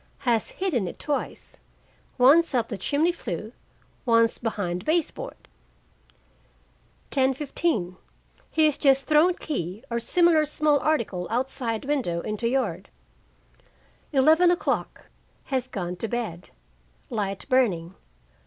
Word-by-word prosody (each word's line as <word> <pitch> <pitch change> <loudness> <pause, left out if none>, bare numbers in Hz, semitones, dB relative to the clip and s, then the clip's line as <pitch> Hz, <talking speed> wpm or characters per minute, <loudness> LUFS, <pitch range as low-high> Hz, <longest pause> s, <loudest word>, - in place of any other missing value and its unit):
Has 230 -3 +2
hidden 295 - -2
it - - -7
twice, 290 -2 -4 0.6
once 285 +4 +5
up 235 -2 0
the 215 - -3
chimney 300 - +1
flue, 215 - -6 0.5
once 230 -2 +3
behind 185 -6 -3
base 320 +5 +1
board. - - -9 1.6
10:15 265 - 0 0.5
He 315 - +3
has 300 -2 +1
just 275 -1 +3
thrown 320 +4 +4
key 205 - -4
or 235 - 0
similar 340 +4 +3
small 300 -1 +2
article 230 -13 -1
outside 245 -1 -2
window 250 -13 -1
into 215 +4 -2
yard. 205 -9 -2 1.2
11:00 320 +5 +3 0.6
Has 260 -2 -2
gone 180 -7 -4
to 225 - -2
bed. 215 -7 -4 0.6
Light 200 -4 -3
burning. 195 -11 +1
255 Hz, 110 wpm, -25 LUFS, 210-300 Hz, 1.6 s, once